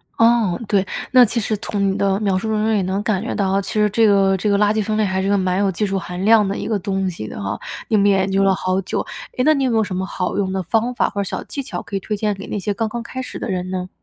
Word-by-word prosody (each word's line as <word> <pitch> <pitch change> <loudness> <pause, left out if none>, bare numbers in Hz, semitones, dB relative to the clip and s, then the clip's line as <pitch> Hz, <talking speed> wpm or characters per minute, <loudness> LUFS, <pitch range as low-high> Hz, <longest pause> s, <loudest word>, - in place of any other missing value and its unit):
哦， 230 -5 +3
对， 200 -2 +2 0.3
那 255 -1 +8
其 235 +1 +1
实 215 0 -1
从 200 -1 -1
你 - - -2
的 195 0 +1
描 195 -2 +1
述 220 +3 -2
当 215 - +1
中 220 - +2
也 200 - +2
能 190 +2 -1
感 205 -4 0
觉 240 - -3
到 195 -3 0
啊， 195 +1 +2
其 - - -6
实 210 -1 +3
这 225 +1 +4
个 195 -1 +4
这 210 +3 -1
个 200 - +3
垃 210 +1 +3
圾 215 -1 0
分 215 +1 -1
类 215 - +2
还 190 -1 -1
是 195 - -1
个 200 - +3
蛮 185 0 0
有 200 -1 +2
技 210 +4 -1
术 195 -1 -1
含 180 +1 -6
量 215 -2 +5
的 195 - -2
一 - - -4
个 215 -2 0
东 195 0 -1
西 165 -12 -5
的 - - -7
哈， 100 +1 -3 0.3
你 220 - +2
们 200 0 +4
也 195 - +4
研 190 0 0
究 195 - +2
了 195 -1 +3
好 185 +1 -1
久。 - - -2 0.4
哎， 250 - +2
那 310 - +6
你 275 - 0
有 - - +1
没 225 - +2
有 220 - +3
什 205 -3 -4
么 185 - -1
好 180 -2 -3
用 195 -2 0
的 190 0 -2
方 230 +6 0
法 - - +1
或 200 - -3
者 - - 0
小 195 - -4
技 280 - -5
巧 185 -9 -6
可 200 - -7
以 195 - 0
推 210 +2 -3
荐 210 0 0
给 195 0 -9
那 - - -3
些 205 +1 -2
刚 225 +1 -2
刚 235 +1 -5
开 260 +2 -6
始 - - -7
的 - - -5
人 185 -1 -3
呢？ 185 -1 -4
200 Hz, 360 characters per minute, -20 LUFS, 190-215 Hz, 0.4 s, 那